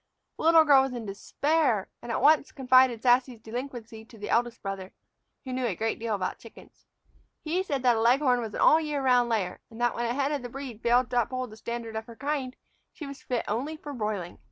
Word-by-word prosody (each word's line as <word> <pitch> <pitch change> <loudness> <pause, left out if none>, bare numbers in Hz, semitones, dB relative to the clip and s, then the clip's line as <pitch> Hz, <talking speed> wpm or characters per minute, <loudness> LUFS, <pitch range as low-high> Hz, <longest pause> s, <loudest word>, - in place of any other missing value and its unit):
The - - -4
little 325 -1 +7
girl 280 -3 +7
was 265 -1 -2
in 235 -2 -5
despair, 250 +3 0
and 240 - -6
at - - -1
once 300 -1 +4
confided 255 -3 +3
Sassy's 250 -1 +3
delinquency 230 -1 -7
to 225 0 -16
the 205 0 -6
eldest 235 0 0
brother, 195 -1 -5 0.5
who 260 - -5
knew 255 -1 -1
a 200 - -2
great 225 +3 -2
deal 225 -1 -1
about 185 -2 -3
chickens. 230 - -16 0.6
He 335 +4 0
said 280 -8 -3
that 245 -2 +4
a - - 0
leghorn 250 +1 +3
was 220 -3 -6
an - - -3
all 315 - +6
year 295 -3 -2
round 245 -2 +3
layer, 200 -6 -1
and 225 - -12
that 240 0 +2
when 240 - -2
a 235 - -1
hen 280 +1 0
of 290 -3 -2
the 245 - -7
breed 255 -4 -8
failed 245 +1 +2
to 245 -1 +3
uphold 255 0 -4
the - - -10
standard 235 0 -5
of 220 0 -5
her 235 - -11
kind 275 -1 -3 0.4
she 310 - -9
was 275 -1 -9
fit 245 -2 -2
only 270 +9 -2
for 295 -1 -8
broiling. 210 -7 -4
245 Hz, 230 wpm, -27 LUFS, 225-275 Hz, 0.6 s, little